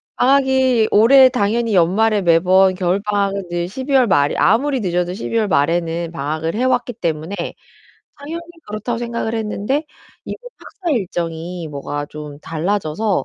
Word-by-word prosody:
방학이 260 -3 +3
올해 260 +5 +7
당연히 230 -1 0
연말에 200 +5 +3
매번 185 +3 +4
겨울방학은 200 +1 -1
이제 175 0 -3
12 260 +8 -5
월 260 -2 +5
말에 145 -7 +2
아무리 265 +5 +2
늦어도 180 -2 -1
12 230 +3 -3
월 220 -2 +1
말에는 165 +1 0
방학을 160 +2 -3
해 240 - -1
왔기 250 -1 0
때문에 165 -3 -3 0.8
당연히 310 +4 -6 0.3
그렇다고 215 +3 -4
생각을 235 -1 -3
했는데 225 +6 -2 0.4
이번 - - -8
학사 360 -4 -6
일정이 175 -4 -4
뭐가 145 0 -5
좀 150 -1 -9
달라져서 180 +4 -1
200 Hz, 315 characters per minute, -19 LUFS, 170-235 Hz, 0.8 s, 올해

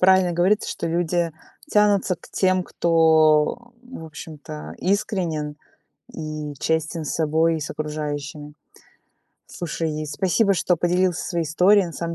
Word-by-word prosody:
правильно 185 -1 +5
говорится, 185 +5 +2
что 170 - -4
люди 170 0 0 0.4
тянутся 205 -3 +3
к - - -17
тем, 185 -1 +2
кто, 160 +6 +3
в 250 -9 -10
общем-то, 145 - -9
искренен 175 -7 -1 0.6
и 155 -2 -5
честен 160 0 -1
с - - -2
собой 160 +1 +2
и - - -5
с 150 - -5
окружающими. 150 -1 -5 0.9
Слушай, 160 -2 -4
спасибо, 195 +5 +1
что 180 -1 +1
поделился 175 +1 +1
своей 170 -2 -1
историей. 185 +5 +4
На 170 - -8
самом 170 +1 -4
165 Hz, 130 wpm, -23 LUFS, 155-185 Hz, 0.9 s, правильно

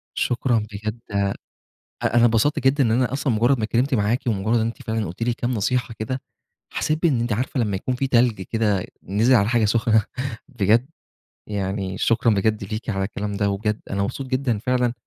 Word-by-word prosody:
شكرًا 120 -1 +1
بجد 110 +3 -4
أ 100 -1 +1 0.7
أنا 120 0 +4
اتبسطت 120 +7 +3
جدًا 135 +1 +3
إن 110 - +2
أنا 125 +2 +2
أصلًا 135 -2 0
مجرد 120 +4 +3
ما 110 - -1
اتكلمت 125 +5 +1
معاكِ، 110 +3 +2
ومجرد 110 +1 0
إن 110 - +1
أنتِ 115 - -6
فعلًا 110 -3 -2
قُلتِ 90 +7 -7
لي 120 0 +1
كام 120 0 -2
نصيحة 120 +2 0
كده، 130 +4 -3 0.5
حسيت 155 +2 -1
بإن 140 -9 +3
أنتِ 120 -1 -1
عارفة 125 +3 -1
لمّا 105 -4 0
يكون 125 +6 -2
في 135 +2 -1
تلج 120 -6 +2
كده 105 -2 0 0.2
نزل 110 +7 +2
على 100 -2 +4
حاجة 120 -2 +2
سخنة 110 0 +3 0.4
بجد، 115 +1 +2 0.6
يعني 95 -1 -3
شكرًا 115 -1 +3
بجد 105 +1 0
ليكِ 110 +3 -4
على 95 -1 -1
الكلام 105 0 -4
ده، 100 0 +1
وبجد 105 +2 -1
أنا 100 0 0
مبسوط 130 +6 -3
جدًا 130 -4 0
فعلًا، 125 +1 +1
115 Hz, 190 wpm, -23 LUFS, 105-125 Hz, 0.7 s, أنا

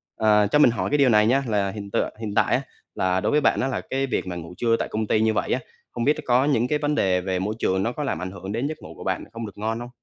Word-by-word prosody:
Ờ, 105 -1 +4
cho 150 - +4
mình 120 - +6
hỏi - - -2
cái 145 - +2
điều 135 -3 +4
này 105 -1 +5
nha, 135 +3 +3
là 100 -3 +1
hiện 100 -1 -8
tượng - - 0
hiện 105 -2 -5
tại - - +3
á - - 0 0.3
là 95 0 +1
đối - - 0
với 150 0 +3
bạn - - +2
á 130 - 0
là 135 - -2
cái 135 +1 -2
việc 95 - -2
mà 90 - -4
ngủ 85 +1 -8
trưa 115 -1 +2
tại - - -1
công 110 0 -3
ty 110 - +2
như 110 0 +2
vậy - - -1
á, - - +2 0.3
không 120 - -3
biết 145 +4 +4
đ 155 - -10
có 125 +2 +3
những 125 -4 +2
cái 150 +2 0
vấn 150 0 0
đề 90 -5 +2
về 95 -1 -2
môi 105 +3 -2
trường 95 +1 +1
nó 115 - 0
có 150 +4 -4
làm 90 - -2
ảnh 95 0 -4
hưởng 95 0 -7
đến 120 +6 -1
giấc 155 - -5
ngủ - - -10
của - - -9
bạn - - -2
không 115 0 -5
được 100 -1 -10
ngon 110 +2 -2
hông? 120 0 -7
110 Hz, 335 wpm, -24 LUFS, 100-130 Hz, 0.3 s, mình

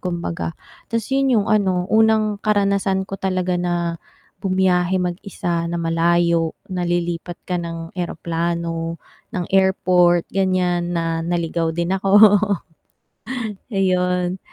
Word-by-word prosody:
kumbaga. 170 -2 -3 0.3
'Tas 230 -1 -1
'yun 270 -2 +3
'yung 200 - -3
ano, 190 -4 +2
unang 220 -1 +3
karanasan 200 -2 +1
ko 195 - -5
talaga 185 -1 -1
na 175 -1 -1 0.4
bumiyahe 185 -1 +2
mag-isa 175 -1 -2
na 170 - -2
malayo, 170 0 +2 0.2
na 180 -1 -2
lilipat 175 0 -2
ka 180 -1 -1
ng 165 -1 -6
eroplano, 170 -1 -3 0.4
ng 180 - -1
airport 180 -2 +3
ganiyan, 180 -2 0
na 165 -1 -1
naligaw 170 -1 -1
din 170 +2 0
ako. 205 +2 +6 1.4
Ayun, 180 -1 +1
180 Hz, 110 wpm, -21 LUFS, 170-190 Hz, 1.4 s, ako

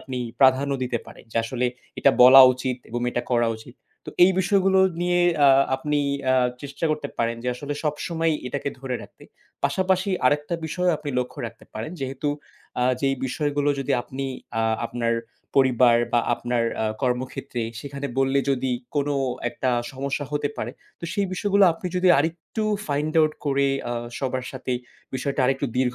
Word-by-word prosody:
আপনি 130 -1 -5 0.2
প্রাধান্য 135 +1 +4
দিতে 120 -2 -1
পারেন। - - -13
যে - - -5
আসলে 125 +1 -1 0.3
এটা 140 - +5
বলা 130 +2 +10
উচিত 130 0 -3
এবং 120 +1 -3
এটা 120 - -2
করা 120 -1 +3
উচিত। 115 +3 -14 0.3
তো - - -5
এই 190 - +4
বিষয়গুলো 190 0 +3 0.2
নিয়ে 175 0 +2 0.3
আ - - +8 0.3
আপনি 150 +2 -1 0.3
আ - - +4 0.3
চেষ্টা 140 +3 -5
করতে 150 -2 -2
পারেন 115 0 0
যে 125 - -2
আসলে 145 +3 -5
সবসময়ই 160 +1 0
এটাকে 140 +2 -3
ধরে 130 -1 -4
রাখতে। - - -15 0.4
পাশাপাশি 190 +1 +1 0.2
আরেকটা 150 +4 +1
বিষয় 180 +3 -1
আপনি 150 -1 -5
লক্ষ্য 125 0 -4
রাখতে 115 0 -12
পারেন 110 +6 -5
যেহেতু 135 +2 -3 0.5
আ 125 - +3 0.2
যেই 135 -1 +2
বিষয়গুলো 145 +1 -1
যদি 135 - -1
আপনি 135 +2 -6 0.4
আ - - +1 0.2
আপনার 115 -1 -1 0.4
পরিবার 125 -3 +5 0.2
বা 120 - +4
আপনার 120 -1 -1 0.2
আ - - +1 0.2
কর্মক্ষেত্রে 125 -1 -2 0.2
সেখানে 140 +1 -5
বললে 135 +1 +2
যদি 130 -1 0 0.3
কোনো 145 0 +1 0.3
একটা 130 +1 -2 0.2
সমস্যা 140 +2 -3
হতে 145 -1 0
পারে 115 - -3 0.3
তো - - -6
সেই 200 -1 +1
বিষয়গুলো 200 +1 +3
আপনি 165 - -7
যদি 180 0 +3
আরেকটু 165 +8 -2 0.3
find 150 +2 -1
out 155 0 +3
করে 140 0 +2 0.2
আ - - -1 0.3
সবার 130 -2 -2
সাথে 130 -1 -4 0.4
বিষয়টা 140 +2 -2
আরেকটু 135 +2 +1
দীর্ঘ 125 -1 +1
135 Hz, 165 wpm, -24 LUFS, 125-150 Hz, 0.5 s, বলা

